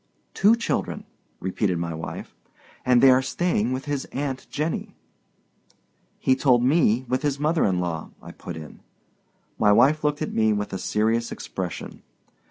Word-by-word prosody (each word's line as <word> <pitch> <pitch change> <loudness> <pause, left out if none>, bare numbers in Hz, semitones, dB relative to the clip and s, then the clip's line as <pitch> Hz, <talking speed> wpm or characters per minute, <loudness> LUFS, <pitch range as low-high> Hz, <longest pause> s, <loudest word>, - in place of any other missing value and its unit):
"Two 210 +4 +5
children," 235 - -2 0.4
repeated 95 0 -1
my 85 0 -3
wife; 80 +1 -7 0.5
"and 125 0 +4
they 135 - +9
are 130 +1 +5
staying 130 -4 0
with 130 +1 -3
his 145 -2 -2
aunt 135 -2 -4
Jenny." 155 +2 -3 1.2
"He 130 - +2
told 125 -3 +3
me 130 -3 +3
with 130 +2 0
his 145 -2 -1
mother 155 +2 +2
in 95 -3 +1
law," 85 -3 -3
I - - -11
put - - -8
in. 75 -2 -10 0.8
My 105 -1 +5
wife 145 +9 +4
looked 150 +1 0
at - - -4
me 110 -1 +3
with 105 -1 -3
a 95 - -3
serious 115 +4 0
expression. 90 -3 -6
125 Hz, 160 wpm, -24 LUFS, 105-145 Hz, 1.2 s, they